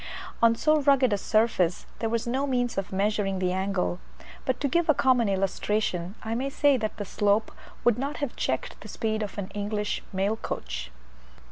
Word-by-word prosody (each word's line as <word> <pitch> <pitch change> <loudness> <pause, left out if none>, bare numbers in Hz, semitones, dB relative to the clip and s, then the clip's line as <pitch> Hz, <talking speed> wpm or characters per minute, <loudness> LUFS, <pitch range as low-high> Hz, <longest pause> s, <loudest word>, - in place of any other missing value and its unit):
On 230 0 +6
so 305 +5 +3
rugged 270 -5 +4
a - - +2
surface 205 -6 +2
there 225 - 0
was 230 +1 -1
no 265 +4 0
means 245 -3 0
of 195 0 -3
measuring 195 0 0
the 185 -1 0
angle, 190 -1 -1 0.5
but 260 - 0
to 285 - +1
give 340 +4 +1
a 310 - +6
common 245 -5 +3
illustration, 195 -1 -1
I 225 - -2
may 260 +4 -1
say 285 0 +3
that 220 -4 -2
the 205 - -4
slope 205 +2 +1 0.3
would 240 -1 +3
not 280 +3 -2
have 285 -5 -3
checked 130 - -2
the 215 - -9
speed 220 +1 -2
of 210 -1 -5
an 200 -1 -4
English 210 0 -2
mail 200 +3 0
coach. 60 - -5
215 Hz, 190 wpm, -27 LUFS, 195-250 Hz, 0.5 s, On